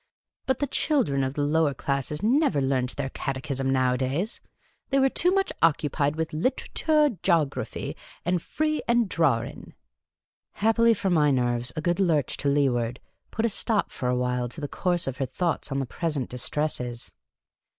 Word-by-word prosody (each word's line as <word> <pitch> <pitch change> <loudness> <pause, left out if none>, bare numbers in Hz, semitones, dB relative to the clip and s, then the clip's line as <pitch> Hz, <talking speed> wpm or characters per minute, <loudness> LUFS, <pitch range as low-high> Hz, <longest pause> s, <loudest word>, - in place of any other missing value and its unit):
But 265 -2 +2
the 285 - 0
children 250 - +1
of 130 +1 -2
the 145 - 0
lower 150 -1 +2
classes 140 +4 -2
never 255 - +3
learnt 130 -1 0
their 135 -2 -3
cate 135 -2 -3
chism 135 -1 -2
nowadays; 130 - 0 0.5
they 275 - +2
were 270 0 +4
too 355 - +2
much 390 +1 +1
occupied 150 -2 +2
with 160 -1 -3
litera 250 - -1
toor, 305 -1 +3
jography, 165 -6 0 0.3
and 175 0 +1
free 310 - -1
'and 235 -2 +3
drawrin'. 140 -11 -1 0.8
Happily 225 +2 +3
for 190 -1 -1
my 150 -4 +4
nerves, 120 -2 +1
a 155 - -2
good 175 +3 0
lurch 160 -8 +1
to 145 - 0
leeward 125 -4 +1 0.3
put 225 - -1
a - - +2
stop 215 0 +1
for 125 - -3
a 125 - +1
while 125 -1 -1
to 155 - -9
the 145 - -3
course 175 +3 0
of 135 -1 -4
her 135 -1 -1
thoughts 160 +3 -2
on 135 - -1
the 135 - -1
present 145 -1 -3
distresses. 125 -2 -3
150 Hz, 170 wpm, -26 LUFS, 130-195 Hz, 0.8 s, were